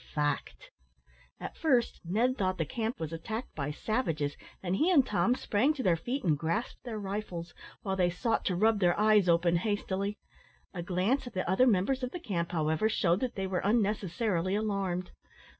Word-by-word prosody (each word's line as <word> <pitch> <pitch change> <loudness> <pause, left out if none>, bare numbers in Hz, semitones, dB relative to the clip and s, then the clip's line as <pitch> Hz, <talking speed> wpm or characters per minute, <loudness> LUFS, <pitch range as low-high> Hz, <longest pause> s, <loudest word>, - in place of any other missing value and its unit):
fact!" 150 - -2 0.7
At - - -6
first 255 -7 +1
Ned 225 +9 +1
thought 185 -5 0
the 160 - 0
camp 225 - -3
was 160 0 -4
attacked 220 +9 -5
by 145 -1 -3
savages, 155 - -1 0.3
and 180 0 0
he 325 - +3
and 295 -8 +5
Tom 230 +4 +2
sprang 260 +7 +1
to 265 - -3
their 180 -5 +4
feet 245 - -3
and 160 -6 +3
grasped 165 - -2
their 235 -3 -5
rifles, 195 -5 -5 0.3
while 190 -3 -1
they 180 -2 +2
sought 225 +6 0
to 185 - +1
rub 215 +3 +3
their 175 -1 +3
eyes 210 -3 +5
open 170 0 +4
hastily. 200 +1 -2 0.6
A 175 - -4
glance 190 +10 0
at - - -8
the 185 - -2
other 190 +8 +4
members 235 +5 +2
of 250 - -2
the 355 - -6
camp, 175 - -2
however, 160 +5 +1
shewed 180 -4 +2
that 255 0 -2
they 195 - -2
were 185 -1 -1
unnecessarily 200 -3 +1
alarmed. 195 -4 -1
195 Hz, 185 wpm, -30 LUFS, 175-225 Hz, 0.7 s, and